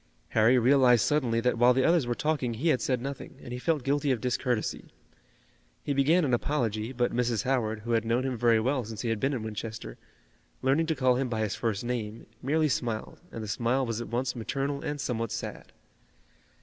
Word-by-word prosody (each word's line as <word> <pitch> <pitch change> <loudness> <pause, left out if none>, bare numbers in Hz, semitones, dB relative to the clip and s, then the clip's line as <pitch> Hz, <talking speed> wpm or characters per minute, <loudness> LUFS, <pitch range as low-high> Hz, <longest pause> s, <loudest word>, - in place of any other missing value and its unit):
Harry 115 +3 +4
realized 125 -2 +5
suddenly 125 -6 +1
that 125 0 0
while 125 +1 +6
the 130 - +3
others 165 -5 +3
were 120 - 0
talking 140 -6 -1
he 150 +9 0
had 130 - +2
said 130 -2 0
nothing, 135 +2 -7
and 120 - -7
he 125 - -4
felt 155 0 0
guilty 145 +2 +1
of 130 -3 +1
discourtesy. 125 -2 -1 1.0
He 145 - -1
began 150 +5 +3
an 130 - 0
apology, 115 -4 -1
but 125 -1 0
Mrs. 120 -2 0
Howard, 115 -5 0
who 120 +2 -4
had 115 -1 +2
known 115 +3 +1
him 130 -1 -1
very 115 -1 +3
well 130 +3 0
since 110 -1 -7
he 120 - -2
had 115 -2 0
been 135 +4 +1
in 120 -5 -3
Winchester, 110 - -6 0.6
learning 140 +5 +2
to 160 - 0
call 130 -2 +3
him 130 -1 -1
by 110 -2 -1
his 105 -2 -1
first 110 -3 -2
name, 115 -2 -4 0.2
merely 155 +4 +2
smiled 115 -5 -3
and 115 - -6
the - - -6
smile 120 +5 0
was 115 -1 -3
at 120 - -6
once 120 +1 -2
maternal 140 +4 -2
and 145 -2 -4
somewhat 115 -5 -2
sad. - - -6
125 Hz, 210 wpm, -28 LUFS, 115-135 Hz, 1.0 s, while